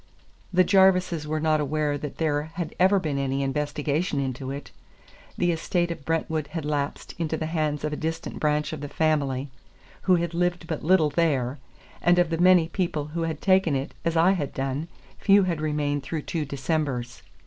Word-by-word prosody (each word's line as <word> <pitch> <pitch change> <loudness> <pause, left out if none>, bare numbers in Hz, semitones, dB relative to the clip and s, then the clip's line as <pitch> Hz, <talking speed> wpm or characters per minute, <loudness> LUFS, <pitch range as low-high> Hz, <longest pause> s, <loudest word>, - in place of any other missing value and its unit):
The 185 0 +5
Jarvises 185 -4 +3
were 155 +1 -1
not 155 -1 +2
aware 150 0 0
that 145 0 -6
there 150 -3 +1
had 170 -3 -4
ever 190 +2 +5
been 150 -6 -1
any 135 0 -1
investigation 145 +2 -1
into 130 -1 -3
it. 140 +1 -6 0.7
The 175 -1 +2
estate 175 +1 0
of 155 -5 -7
Brentwood 160 -2 -1
had 160 0 -5
lapsed 145 -1 -2
into 160 -1 -1
the 160 - -3
hands 155 -2 -1
of 150 0 -1
a - - -1
distant 160 +1 -4
branch 150 0 0
of 155 - -6
the 145 - -5
family, 140 -4 0 0.5
who 185 - +4
had 170 -1 -1
lived 175 0 0
but 160 -2 -4
little 160 -2 +4
there; 140 -5 +1 0.4
and 175 +1 +4
of 175 -2 +3
the 165 - -1
many 180 -2 +6
people 165 -4 -2
who 170 - -2
had 155 -2 -5
taken 185 -6 +3
it, 135 +3 -3
as 165 -1 0
I 170 +3 +5
had 155 -8 -2
done, 135 +4 -2 0.3
few 200 0 +5
had 170 -4 -1
remained 150 -2 0
through 150 +3 -4
two 160 -3 -2
Decembers. 135 -3 -2
155 Hz, 190 wpm, -25 LUFS, 145-170 Hz, 0.7 s, many